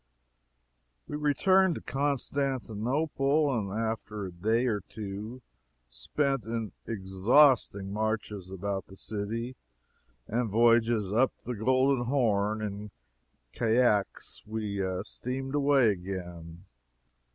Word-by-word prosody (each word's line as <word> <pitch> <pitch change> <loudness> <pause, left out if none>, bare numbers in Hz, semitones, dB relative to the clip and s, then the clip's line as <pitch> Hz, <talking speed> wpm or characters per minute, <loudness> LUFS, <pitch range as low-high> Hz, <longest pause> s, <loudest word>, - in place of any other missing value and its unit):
We - - -5
returned 175 +5 +3
to - - -6
Constantinople, 140 +1 0
and 100 -4 -2
after 110 -1 -3
a 95 - -6
day 110 +8 +1
or 105 -5 0
two 105 +5 -7 0.5
spent 135 - -1
in 115 0 -3 0.2
exhausting 100 +1 +3
marches 105 -3 -2
about 95 +1 -3
the 95 - -13
city 110 +5 -4 0.7
and 115 +1 -1
voyages 115 -2 +3
up 125 +3 +4
the 125 - -3
Golden 130 +3 +2
Horn 110 -5 +1
in 105 0 -5 0.6
caiques, 115 -3 +1
we 105 -3 -2 0.2
steamed 130 +4 -5
away 140 -5 +4
again. 90 -2 -7
110 Hz, 100 wpm, -29 LUFS, 100-130 Hz, 0.7 s, up